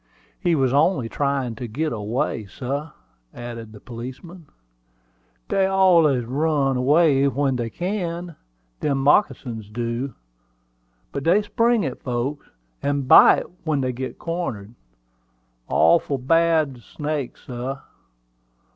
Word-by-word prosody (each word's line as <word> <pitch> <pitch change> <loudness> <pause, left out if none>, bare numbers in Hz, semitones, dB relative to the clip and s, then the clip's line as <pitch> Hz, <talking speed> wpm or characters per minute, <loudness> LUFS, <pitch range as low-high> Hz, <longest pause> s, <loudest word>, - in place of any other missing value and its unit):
"He 175 -4 +2
was 135 -3 +1
only 145 -3 +2
tryin' 140 -1 -1
to 125 - -5
git 150 +7 -2
away, 110 0 -2
sah," 140 +8 -5 0.4
added 115 -2 -7
the 105 - -12
policeman. 130 - -9 1.0
"Dey 195 -1 +2
allus 170 -10 +4
run 140 +1 +1
away 140 +1 +4
when 135 0 0
dey 120 -1 -3
can, 175 - -4 0.4
dem 145 -2 0
moccasins 135 - +1
do; 120 +3 -3 1.0
but 140 - -4
dey 185 +7 +3
spring 230 -1 +2
at 130 - -5
folks, 130 +3 -3 0.3
and 140 -2 -1
bite - - +7 0.2
when 155 -4 0
dey 130 -1 0
git 130 +1 -6
cornered. 125 - -4 0.9
Awful 155 -4 +3
bad 155 -1 +2
snake, 150 -1 -4
sah. 130 +2 -6
140 Hz, 115 wpm, -23 LUFS, 125-165 Hz, 1.0 s, bite